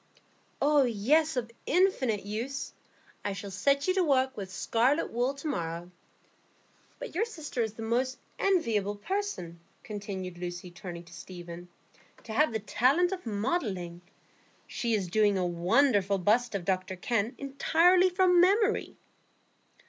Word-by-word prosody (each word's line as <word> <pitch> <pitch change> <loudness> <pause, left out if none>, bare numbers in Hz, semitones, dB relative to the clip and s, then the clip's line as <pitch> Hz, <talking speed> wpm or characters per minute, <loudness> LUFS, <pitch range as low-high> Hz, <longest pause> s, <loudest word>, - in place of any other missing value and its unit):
"Oh 295 0 +4
yes, 270 +6 +2
of 235 -2 -2 0.2
infinite 265 - +2
use. 230 +7 -4 0.5
I 200 - -2
shall 200 0 -7
set 280 - +1
you 370 - +3
to 375 -1 +2
work 265 -4 +2
with 195 -4 -6
scarlet 245 - +1
wool 245 +4 0
to 275 +3 -6
morrow. 170 - -3 1.1
But - - -7
your 375 - +1
sister 315 - -5
is 220 -1 -2
the 225 - -6
most 255 +4 0 0.2
enviable 225 - +1
person," 205 - -4 0.2
continued 195 -4 -6
Lucy, 175 0 -6
turning 175 -2 -8
to 170 - -16
Stephen, 175 -1 -9 0.5
"to 220 - -7
have 300 +3 +3
the 220 - -1
talent 260 - +2
of 370 -8 -5
modelling. 200 - -2 0.6
She 235 -2 -1
is 200 -3 -1
doing 205 +2 +3
a 185 - 0
wonderful 195 +4 +2
bust 215 +5 +2
of 185 -3 -3
Dr 190 -1 -1
Kenn 225 +4 -1
entirely 335 +7 +3
from 360 -1 +4
memory." 410 +4 +2
230 Hz, 140 wpm, -29 LUFS, 190-290 Hz, 1.1 s, Oh